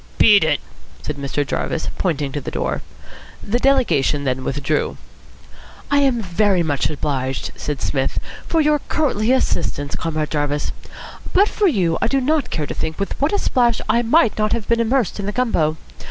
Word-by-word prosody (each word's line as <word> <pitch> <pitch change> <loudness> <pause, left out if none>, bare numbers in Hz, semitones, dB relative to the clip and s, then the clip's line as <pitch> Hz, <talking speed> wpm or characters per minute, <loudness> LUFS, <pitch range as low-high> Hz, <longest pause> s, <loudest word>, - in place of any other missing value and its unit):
"Beat 205 -5 +6
it," 155 -2 +2 0.4
said 150 - -4
Mr. 140 +1 -2
Jarvis, 160 +4 -2
pointing 150 -6 -1
to 145 - -4
the - - -5
door. - - -2 0.6
The 235 +4 0
delegation 175 - +2
then 130 -1 -1
withdrew. 145 +3 -1 0.9
"I 285 - +4
am 260 -5 +2
very 190 0 +2
much 145 -4 0
obliged," 135 -3 -2
said 145 -3 -4
Psmith, 135 -2 -1 0.3
"for 325 - +2
your 300 0 +3
courtly 250 -7 +1
assistance, 145 - 0
Comrade 155 -2 -2
Jarvis. 145 -1 -1 0.6
But 400 +3 +5
for 415 - +2
you 180 - +1
I - - +2
do 275 - +2
not 290 +1 +1
care 155 - -2
to - - -5
think 160 - -4
with 200 - -2
what 285 - +2
a 410 - +1
splash 240 - +2
I 230 +2 +3
might 240 -1 +3
not 215 +1 +1
have 230 -3 -2
been 235 0 +2
immersed 230 -2 +1
in 200 - -3
the - - 0
gumbo. 175 -10 +1
195 Hz, 180 wpm, -20 LUFS, -, 0.9 s, Beat